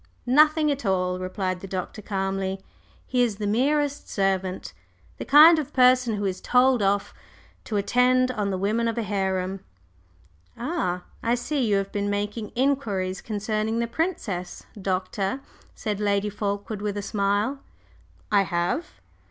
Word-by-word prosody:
"Nothing 305 Hz, +4 st, +4 dB
at 280 Hz, -2 st, -3 dB
all," 185 Hz, -2 st, 0 dB
replied 185 Hz, 0 st, -3 dB
the 195 Hz, -, -8 dB
Doctor, 185 Hz, +3 st, -5 dB
calmly. 195 Hz, -1 st, -2 dB, 0.5 s
"He 250 Hz, -1 st, 0 dB
is 235 Hz, -4 st, +1 dB
the 205 Hz, +1 st, -4 dB
merest 285 Hz, +6 st, 0 dB
servant 190 Hz, -, -1 dB, 0.5 s
the -, -, -4 dB
kind 315 Hz, +3 st, +8 dB
of 295 Hz, -, -5 dB
person 250 Hz, -3 st, +4 dB
who 205 Hz, 0 st, -2 dB
is 190 Hz, -1 st, -2 dB
'told 250 Hz, -1 st, +3 dB
off' 200 Hz, 0 st, +1 dB, 0.5 s
to 215 Hz, -, -2 dB
attend 250 Hz, +4 st, +3 dB
on 210 Hz, -5 st, -2 dB
the 190 Hz, -, -1 dB
women 215 Hz, +5 st, 0 dB
of 230 Hz, -, -2 dB
a 230 Hz, -, 0 dB
harem." 190 Hz, -1 st, -1 dB, 1.0 s
"Ah, 235 Hz, -, -2 dB, 0.2 s
I 235 Hz, +1 st, +1 dB
see 270 Hz, +3 st, -1 dB
you 205 Hz, -, +2 dB
have 195 Hz, 0 st, -1 dB
been 205 Hz, 0 st, -1 dB
making 205 Hz, +2 st, -3 dB
inquiries 225 Hz, -9 st, 0 dB
concerning 215 Hz, +1 st, -2 dB
the 235 Hz, -, +1 dB
princess, 230 Hz, -, -3 dB, 0.2 s
Doctor," 190 Hz, +5 st, -2 dB, 0.3 s
said 210 Hz, -2 st, -3 dB
Lady 205 Hz, 0 st, 0 dB
Fulkeward, 205 Hz, 0 st, -3 dB
with 205 Hz, -1 st, -2 dB
a 205 Hz, -, -3 dB
smile. 205 Hz, +6 st, 0 dB, 0.7 s
"I 205 Hz, -1 st, +5 dB
have." 175 Hz, -, -1 dB
205 Hz, 150 wpm, -25 LUFS, 195-250 Hz, 1.0 s, kind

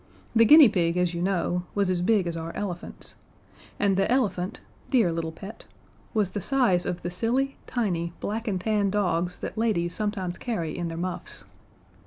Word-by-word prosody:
The 230 Hz, 0 st, +7 dB
guinea 300 Hz, +3 st, +9 dB
pig, 175 Hz, -4 st, +1 dB
as 180 Hz, -1 st, +1 dB
you 170 Hz, -, -3 dB
know, 180 Hz, -1 st, 0 dB
was 200 Hz, -1 st, +2 dB
as 180 Hz, -1 st, 0 dB
big 200 Hz, 0 st, +3 dB
as 170 Hz, -1 st, -3 dB
our 165 Hz, 0 st, -4 dB
elephants, 180 Hz, -4 st, -5 dB, 0.6 s
and 200 Hz, -2 st, +2 dB
the 195 Hz, -, +2 dB
elephant 195 Hz, -8 st, 0 dB, 0.3 s
dear 230 Hz, -10 st, +3 dB
little 165 Hz, -1 st, -2 dB
pet 195 Hz, +6 st, -10 dB, 0.5 s
was 210 Hz, -5 st, +1 dB
the 205 Hz, -, -3 dB
size 240 Hz, -8 st, +2 dB
of 175 Hz, -, -3 dB
the 175 Hz, -, -3 dB
silly, 245 Hz, +9 st, 0 dB
tiny, 175 Hz, -8 st, -1 dB
black 225 Hz, +3 st, -3 dB
and 190 Hz, -4 st, 0 dB
tan 205 Hz, 0 st, +1 dB
dogs 180 Hz, -3 st, 0 dB
that -, -, -4 dB
ladies 175 Hz, -7 st, +1 dB
carry 210 Hz, -1 st, 0 dB
sometimes 185 Hz, -4 st, -4 dB, 0.4 s
in 175 Hz, -1 st, -2 dB
their 165 Hz, 0 st, -5 dB
muffs. 180 Hz, +1 st, -4 dB
190 Hz, 180 wpm, -26 LUFS, 175-220 Hz, 0.6 s, guinea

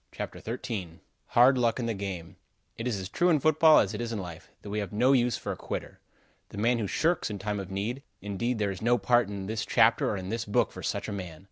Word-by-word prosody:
CHAPTER -, -, -6 dB
XIII 105 Hz, -7 st, -5 dB, 0.3 s
HARD 125 Hz, +2 st, +5 dB
LUCK 120 Hz, 0 st, +1 dB
IN 120 Hz, -, -1 dB
THE 115 Hz, -, -1 dB
GAME 95 Hz, -5 st, -6 dB, 0.4 s
It 115 Hz, -, -4 dB
is 115 Hz, -5 st, -1 dB
as 95 Hz, -1 st, -5 dB
true 175 Hz, -, +1 dB
in 160 Hz, -4 st, +4 dB
football, 155 Hz, +1 st, +6 dB
as 100 Hz, +1 st, +3 dB
it 105 Hz, -, -4 dB
is 120 Hz, -1 st, -3 dB
in 115 Hz, -, -2 dB
life, 85 Hz, -5 st, -8 dB
that 100 Hz, -, -7 dB
we 105 Hz, -, -1 dB
have 100 Hz, -4 st, -4 dB
no 125 Hz, +6 st, +3 dB
use 125 Hz, -2 st, +2 dB
for -, -, -4 dB
a -, -, -3 dB
quitter. -, -, -6 dB, 0.5 s
The -, -, -10 dB
man 115 Hz, +3 st, +2 dB
who 105 Hz, -, -1 dB
shirks 165 Hz, -, +1 dB
in 105 Hz, -, -4 dB
time 105 Hz, +1 st, -3 dB
of 95 Hz, -2 st, -6 dB
need 105 Hz, +7 st, -3 dB, 0.2 s
indeed 105 Hz, +5 st, -2 dB
there 105 Hz, -2 st, 0 dB
is 95 Hz, -, -7 dB
no 120 Hz, +2 st, +3 dB
part 120 Hz, +2 st, +3 dB
in 100 Hz, -2 st, -5 dB
this 110 Hz, +2 st, -2 dB
chapter -, -, +3 dB
or -, -, -1 dB
in 95 Hz, 0 st, -6 dB
this 115 Hz, +1 st, -2 dB
book 105 Hz, -, +1 dB
for -, -, -9 dB
such -, -, -2 dB
a -, -, -4 dB
man. 90 Hz, -5 st, -6 dB
110 Hz, 260 wpm, -28 LUFS, 100-120 Hz, 0.5 s, football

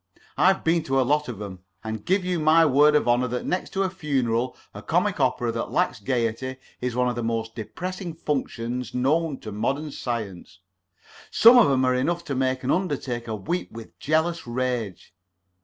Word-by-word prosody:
I've 190 Hz, +1 st, +3 dB
been 165 Hz, +1 st, +2 dB
to 135 Hz, -1 st, +1 dB
a -, -, +4 dB
lot 150 Hz, +3 st, +1 dB
of 120 Hz, -5 st, -6 dB
'em, 100 Hz, -3 st, -7 dB, 0.2 s
and 110 Hz, 0 st, -3 dB
I -, -, -15 dB
give 185 Hz, -, 0 dB
you 180 Hz, -2 st, 0 dB
my 160 Hz, +1 st, +5 dB
word 150 Hz, +1 st, +5 dB
of 150 Hz, -, +2 dB
honor 120 Hz, +1 st, +3 dB
that 125 Hz, +1 st, -3 dB
next 180 Hz, -, -2 dB
to 195 Hz, -, +1 dB
a 190 Hz, -, 0 dB
funeral 130 Hz, -8 st, -1 dB, 0.2 s
a -, -, -8 dB
comic -, -, 0 dB
opera -, -, +1 dB
that -, -, -3 dB
lacks -, -, 0 dB
gayety 120 Hz, +3 st, -1 dB, 0.3 s
is 125 Hz, -1 st, -2 dB
one 125 Hz, 0 st, +2 dB
of 125 Hz, -, -1 dB
the 120 Hz, -, -3 dB
most 115 Hz, -1 st, -2 dB
depressing 175 Hz, -, -6 dB
functions 125 Hz, -5 st, -3 dB
known 145 Hz, +4 st, +1 dB
to 110 Hz, -, -7 dB
modern 135 Hz, +9 st, -2 dB
science. 105 Hz, -9 st, -5 dB, 0.7 s
Some 230 Hz, +3 st, +7 dB
of 230 Hz, -, +5 dB
'em 130 Hz, -1 st, +2 dB
are 130 Hz, -, +3 dB
enough 170 Hz, +7 st, 0 dB
to 140 Hz, -, -3 dB
make 130 Hz, 0 st, 0 dB
an 130 Hz, -, 0 dB
undertaker 130 Hz, -, -2 dB
weep 170 Hz, -, -3 dB
with 115 Hz, -1 st, -11 dB
jealous 160 Hz, 0 st, 0 dB
rage. 120 Hz, -5 st, -3 dB
130 Hz, 190 wpm, -25 LUFS, 115-160 Hz, 0.7 s, Some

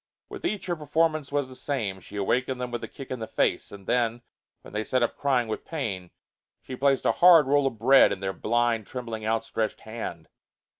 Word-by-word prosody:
With -, -, -9 dB
each 210 Hz, -, -2 dB
her 175 Hz, -, -1 dB
performance 155 Hz, -1 st, 0 dB
was 145 Hz, -2 st, 0 dB
the 130 Hz, -, -12 dB
same; 110 Hz, -10 st, -3 dB
she 100 Hz, -, -13 dB
awakened 125 Hz, +6 st, 0 dB
them 125 Hz, -1 st, -4 dB
with 120 Hz, -, -4 dB
a -, -, -4 dB
kick 135 Hz, -, -10 dB
in 130 Hz, -, -3 dB
the 110 Hz, -, -5 dB
face, -, -, 0 dB
and 100 Hz, -1 st, -11 dB
then, 120 Hz, 0 st, 0 dB, 0.4 s
when -, -, -13 dB
they 105 Hz, +1 st, -1 dB
sat 130 Hz, +2 st, +1 dB
up 120 Hz, -, 0 dB
crying 130 Hz, -4 st, +1 dB
with 110 Hz, -, -4 dB
pain, 100 Hz, -, -4 dB, 0.5 s
she 130 Hz, -, -8 dB
placed 135 Hz, +1 st, +2 dB
a -, -, +5 dB
hard 165 Hz, +5 st, +7 dB
roll 140 Hz, 0 st, +3 dB
of 115 Hz, -, -4 dB
bread 130 Hz, +5 st, +6 dB
in 100 Hz, -, -3 dB
their 95 Hz, 0 st, -2 dB
blind, 115 Hz, -1 st, 0 dB
trembling, 115 Hz, -4 st, -5 dB
outstretched 110 Hz, -1 st, -1 dB
hand. 110 Hz, -7 st, -7 dB
120 Hz, 210 wpm, -26 LUFS, 110-135 Hz, 0.5 s, hard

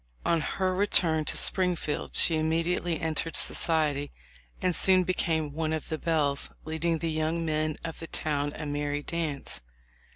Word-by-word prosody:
On 170 Hz, -2 st, +3 dB
her 185 Hz, +4 st, 0 dB
return 170 Hz, -5 st, +3 dB
to -, -, -1 dB
Springfield 180 Hz, -5 st, 0 dB
she 165 Hz, -, +4 dB
immediately 165 Hz, +1 st, 0 dB
entered 160 Hz, 0 st, -1 dB
society, 150 Hz, -3 st, +1 dB, 0.5 s
and 180 Hz, -2 st, +1 dB
soon 185 Hz, -1 st, +5 dB
became 160 Hz, -4 st, 0 dB
one 160 Hz, 0 st, -1 dB
of 155 Hz, -, -3 dB
the 160 Hz, -, -2 dB
belles, 150 Hz, -4 st, +1 dB, 0.2 s
leading 160 Hz, +1 st, 0 dB
the 165 Hz, +1 st, -2 dB
young 160 Hz, +2 st, 0 dB
men 155 Hz, -1 st, 0 dB
of 165 Hz, -1 st, -5 dB
the 165 Hz, -, -7 dB
town 145 Hz, -2 st, -1 dB
a 150 Hz, -, -5 dB
merry 145 Hz, 0 st, -2 dB
dance. 155 Hz, -, -3 dB
160 Hz, 155 wpm, -28 LUFS, 150-170 Hz, 0.5 s, soon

